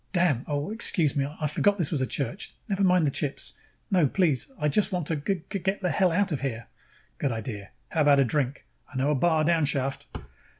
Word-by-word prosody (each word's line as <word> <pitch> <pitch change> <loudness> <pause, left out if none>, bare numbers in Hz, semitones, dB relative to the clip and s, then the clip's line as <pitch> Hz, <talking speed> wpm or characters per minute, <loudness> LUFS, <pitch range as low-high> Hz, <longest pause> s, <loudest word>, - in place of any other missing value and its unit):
"Damn! 170 -9 +2
Oh, 145 +5 -2
excuse 175 - +2
me, 140 -1 +1
I 155 - -1
forgot 200 +7 +2
this 170 -6 -1
was 150 -5 0
a 130 - 0
church. 145 +10 -4
Never 200 -2 0
mind 180 -3 +4
the 140 - +1
chips. 140 0 -3 0.4
No, 180 -6 +4
please. 165 - +1
I 150 -4 0
just 195 +8 +2
want 180 -4 -1
to 160 - -1
g 165 +5 -2
g 195 - -3
get 195 +3 -1
the 180 - +1
hell 185 0 +3
out 200 +3 +1
of 150 - -2
here." 115 -5 -3 0.5
"Good 140 - 0
idea. 110 -3 -5 0.2
How 160 - 0
about 145 -1 +5
a 135 - +5
drink? 135 - -1 0.3
I - - -6
know 135 +3 +2
a - - +2
bar 155 +2 +2
downshaft." 145 -5 0
150 Hz, 220 wpm, -27 LUFS, 140-180 Hz, 0.5 s, about